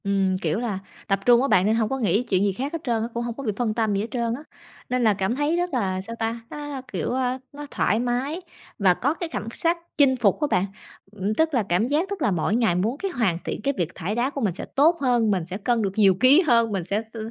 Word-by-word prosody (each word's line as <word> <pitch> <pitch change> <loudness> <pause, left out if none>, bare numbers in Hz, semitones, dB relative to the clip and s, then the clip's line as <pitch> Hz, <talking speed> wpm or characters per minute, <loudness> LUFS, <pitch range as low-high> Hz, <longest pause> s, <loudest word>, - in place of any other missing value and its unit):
Ừm, 195 -2 +1
kiểu 215 - 0
là, 220 -6 -2 0.3
tập 195 -1 +1
trung 240 -1 +6
á 275 - +1
bạn 185 -8 +4
nên 215 +2 +3
hông 220 -2 +1
có 270 - -1
nghĩ 210 0 +2
chuyện 190 -5 +1
gì 205 - +2
khác 270 - -4
hết 330 - -2
trơn 235 -5 0
á, 225 - -1
cũng 235 - -2
hông 235 -1 -4
có 275 - -7
bị 220 - 0
phân 235 -3 0
tâm 220 -2 0
gì 200 - 0
hết 220 - -3
trơn 235 -2 -1
á. 285 - -10 0.5
Nên 250 0 0
là 215 -2 +5
cảm 195 +4 -1
thấy 295 +4 +1
rất 355 -2 -1
là 190 -6 0
sao 230 +4 -7
ta, 225 +1 -2
nó 295 0 -7
là, 280 -2 -5
kiểu, - - -2
a, 255 0 0 0.2
nó 290 +1 -7
thoải 215 - +1
mái 250 +8 -1 0.4
và 190 -3 +5
có 275 - 0
cái 335 0 -5
cảm 225 - -5
sắc 335 +1 +1 0.2
chinh 275 -3 +5
phục 230 +1 +1
á 295 - +2
bạn. 180 - +2 0.5
Ừm, 205 0 -2
tức 320 +3 +1
là 240 -5 +2
cảm 180 +7 +2
giác 310 +8 0
tức 400 -1 -5
là - - +2
mỗi 180 +4 0
ngày 225 -7 +2
muốn 215 +9 0
cái 390 +3 -3
hoàn 220 - 0
thiện - - -4
cái 280 +5 0
việc 175 -2 -2
thải 200 +6 -3
đá 240 +3 +1
của 280 -1 -5
mình 205 -6 +1
sẽ - - -5
tốt 320 +5 +4
hơn, 240 -5 +2
mình 185 -4 0
sẽ 185 +2 -5
cân 235 +2 0
được 195 -2 0
nhiều 200 -3 +5
ký 255 - +6
hơn, 230 - +3
mình 195 -3 -1
sẽ 200 +5 -1
s - - -8
230 Hz, 290 wpm, -24 LUFS, 200-270 Hz, 0.5 s, trung